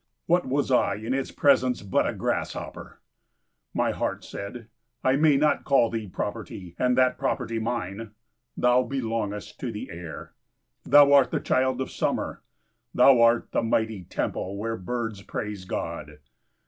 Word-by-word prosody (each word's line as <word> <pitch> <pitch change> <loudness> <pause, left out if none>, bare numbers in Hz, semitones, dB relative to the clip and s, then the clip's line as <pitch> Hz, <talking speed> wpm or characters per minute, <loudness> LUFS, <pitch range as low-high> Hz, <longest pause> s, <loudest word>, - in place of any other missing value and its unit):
What 175 -2 +2
was 140 +1 0
I 110 -5 +3
in 110 +4 -3
its 135 0 -1
presence 130 -5 +2
but 95 - +1
a - - -1
grasshopper? - - -4 0.7
My - - +1
heart - - -3
said, 110 +3 -7 0.4
"I 130 +1 +3
may 150 -1 +4
not 150 +2 +2
call 125 -4 +3
thee 110 -2 -3
property, 95 -2 -6
and 125 0 +2
that 130 0 +3
property 115 -3 -1
mine! 110 -2 -3 0.5
Thou 125 +1 +4
belongest 115 -5 -3
to 125 - -3
the 105 -2 -7
air. 85 -1 -8 0.5
Thou 145 -1 +7
art 140 -2 +6
the - - -1
child 130 0 +1
of 130 - -4
summer. - - -2 0.5
Thou 125 -1 +6
art 115 0 +4
the - - +1
mighty 110 -4 -1
temple 95 +4 -3
where 115 +2 -2
birds 115 0 -4
praise 105 -2 -5
God. 75 -4 -5
115 Hz, 150 wpm, -26 LUFS, 105-130 Hz, 0.7 s, Thou